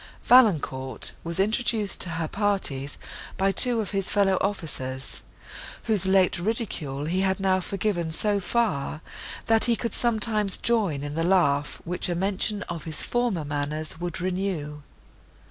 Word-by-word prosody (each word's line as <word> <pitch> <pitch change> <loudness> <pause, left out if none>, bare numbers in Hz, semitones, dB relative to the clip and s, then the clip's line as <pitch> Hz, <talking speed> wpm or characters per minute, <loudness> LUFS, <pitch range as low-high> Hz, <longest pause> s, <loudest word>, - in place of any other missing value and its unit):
Valancourt 155 - +3
was 170 +2 -4
introduced 215 0 +1
to 180 - +3
her 165 -1 -1
parties 190 -9 -1 0.4
by 195 +1 +2
two 235 +4 +5
of 205 - -5
his 195 -2 -1
brother 195 -2 +2
officers, 135 -9 -4 0.6
whose 210 -5 +2
late 190 -2 +3
ridicule 175 - -3
he 180 +4 0
had 190 0 +1
now 190 -1 +2
forgiven 185 -3 -2
so 205 +5 +2
far, 180 -8 -1 0.4
that 225 -1 +4
he 240 -1 +3
could 235 0 -4
sometimes 215 -4 +2
join 200 -12 0
in 145 0 -5
the 165 +2 -1
laugh, 150 -6 +1
which 180 +1 -3
a 175 - -1
mention 200 +3 -1
of 170 -3 -7
his 155 -2 -2
former 240 -10 -1
manners 150 +2 -3
would 175 +1 -4
renew. 180 -5 -3
190 Hz, 145 wpm, -25 LUFS, 155-210 Hz, 0.6 s, two